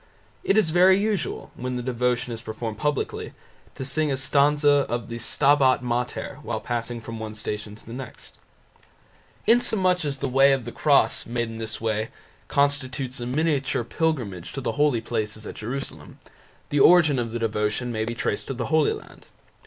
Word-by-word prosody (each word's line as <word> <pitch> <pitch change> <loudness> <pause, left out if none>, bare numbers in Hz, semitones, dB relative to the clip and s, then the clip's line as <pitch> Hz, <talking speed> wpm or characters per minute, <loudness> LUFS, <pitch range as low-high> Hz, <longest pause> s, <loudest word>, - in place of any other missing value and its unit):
It 195 - +2
is 175 -7 +3
very 185 +3 +6
usual, 210 -1 -2
when 125 +1 -4
the 125 - -3
devotion 125 -1 0
is 115 - -6
performed 110 0 -5
publicly, 150 -2 -2 0.4
to 130 - -5
sing 155 +2 0
a 135 - 0
stanza 145 +1 +3
of 120 0 -3
the 115 0 -5
"Stabat 135 +1 +3
Mater" 125 0 -3
while - - -3
passing 120 0 -3
from 115 0 -7
one 110 -1 -6
Station 105 -1 -4
to 110 - -18
the 115 - -9
next. 130 -1 -9 1.1
Inasmuch 200 -7 +3
as 140 -2 -2
the 135 - -2
Way 135 +2 +5
of 130 -4 -2
the - - -5
Cross, - - +2
made 120 0 -2
in 115 0 -7
this 110 0 -4
way, 110 0 -1 0.4
constitutes 135 -2 0
a 120 - -4
miniature 140 -2 0
pilgrimage 120 - -2
to 135 - -4
the - - -1
holy 145 -5 +2
places 110 -2 -3
at - - -6
Jerusalem, 130 +5 -6 0.5
the 145 - +1
origin 155 -4 +6
of 120 -1 -2
the 115 - -3
devotion 110 +1 -1
may 110 -1 -1
be 115 +1 -3
traced 105 - -2
to 135 - -3
the 120 -1 -3
Holy 155 -2 +4
Land. - - -12
125 Hz, 180 wpm, -25 LUFS, 115-145 Hz, 1.1 s, very